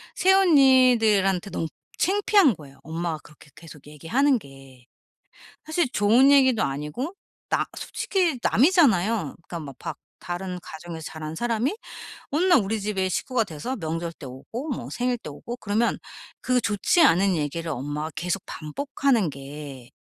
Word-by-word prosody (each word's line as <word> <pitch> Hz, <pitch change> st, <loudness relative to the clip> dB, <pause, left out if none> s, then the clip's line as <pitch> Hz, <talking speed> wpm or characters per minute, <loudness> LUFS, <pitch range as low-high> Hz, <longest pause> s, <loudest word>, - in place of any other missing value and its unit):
새언니들한테 255 Hz, -, +4 dB
너무 165 Hz, -, -2 dB, 0.3 s
창피한 390 Hz, -, +3 dB
거예요 140 Hz, -3 st, -15 dB
엄마가 160 Hz, +1 st, -3 dB
그렇게 150 Hz, -1 st, -18 dB
계속 155 Hz, -3 st, -14 dB
얘기하는 240 Hz, -, +1 dB
게. 135 Hz, -, -16 dB, 0.8 s
사실 315 Hz, -2 st, 0 dB
좋은 235 Hz, +5 st, +4 dB
얘기도 260 Hz, -5 st, +5 dB
아니고 150 Hz, -, -3 dB, 0.4 s
나 -, -, +1 dB
솔직히 350 Hz, -8 st, -1 dB
남이잖아요. 230 Hz, -, +3 dB
그러니까 170 Hz, -, -5 dB
막 140 Hz, -4 st, -7 dB, 0.2 s
다른 180 Hz, +1 st, -5 dB
가정에서 160 Hz, 0 st, -8 dB
자란 155 Hz, 0 st, -6 dB
사람이 240 Hz, -, -1 dB, 0.5 s
어느 305 Hz, +5 st, +1 dB
날 350 Hz, -7 st, +6 dB
우리 215 Hz, +2 st, -2 dB
집에 195 Hz, -2 st, -1 dB
식구가 230 Hz, +5 st, 0 dB
돼서 180 Hz, -, -5 dB
명절 165 Hz, -2 st, -4 dB
때 145 Hz, -, -11 dB
오고 180 Hz, -, -7 dB
뭐 255 Hz, -, -5 dB
생일 250 Hz, 0 st, -1 dB
때 150 Hz, -, -9 dB
오고 235 Hz, +11 st, -7 dB
그러면 215 Hz, +1 st, 0 dB, 0.4 s
그 255 Hz, -1 st, +2 dB
좋지 210 Hz, -, +1 dB
않은 195 Hz, -, +4 dB
얘기를 160 Hz, +2 st, -3 dB
엄마가 145 Hz, +3 st, -4 dB
계속 180 Hz, +3 st, -2 dB
반복하는 235 Hz, -, -1 dB
게 140 Hz, -2 st, -9 dB
195 Hz, 315 characters per minute, -25 LUFS, 155-255 Hz, 0.8 s, 날